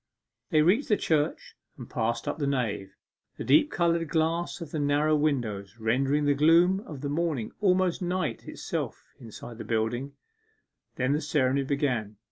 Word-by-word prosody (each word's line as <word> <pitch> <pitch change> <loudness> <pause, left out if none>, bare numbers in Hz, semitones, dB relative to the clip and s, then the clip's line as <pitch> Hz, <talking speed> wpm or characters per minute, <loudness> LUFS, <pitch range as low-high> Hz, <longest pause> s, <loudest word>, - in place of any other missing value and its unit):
They 155 -4 +4
reached 210 - +2
the 210 - +4
church 150 -2 -1 0.2
and - - -9
passed 115 +1 -2
up - - -2
the 140 - 0
nave, 110 -8 -2 0.4
the - - -4
deep 150 - +4
coloured 170 - +1
glass 165 +3 0
of 165 -4 -8
the 155 - -2
narrow 145 +2 +2
windows 115 -10 -1
rendering 135 +6 +1
the 145 - +4
gloom 165 +6 +4
of 145 -4 -8
the 145 - -3
morning 150 -6 -1
almost 185 -3 +2
night 180 +1 -2
itself - - -5
inside 115 0 -10
the - - -4
building. 120 +5 -2 0.8
Then 130 +2 +1
the 150 - 0
ceremony 140 -3 +1
began. 130 -7 -1
145 Hz, 160 wpm, -27 LUFS, 125-165 Hz, 0.8 s, They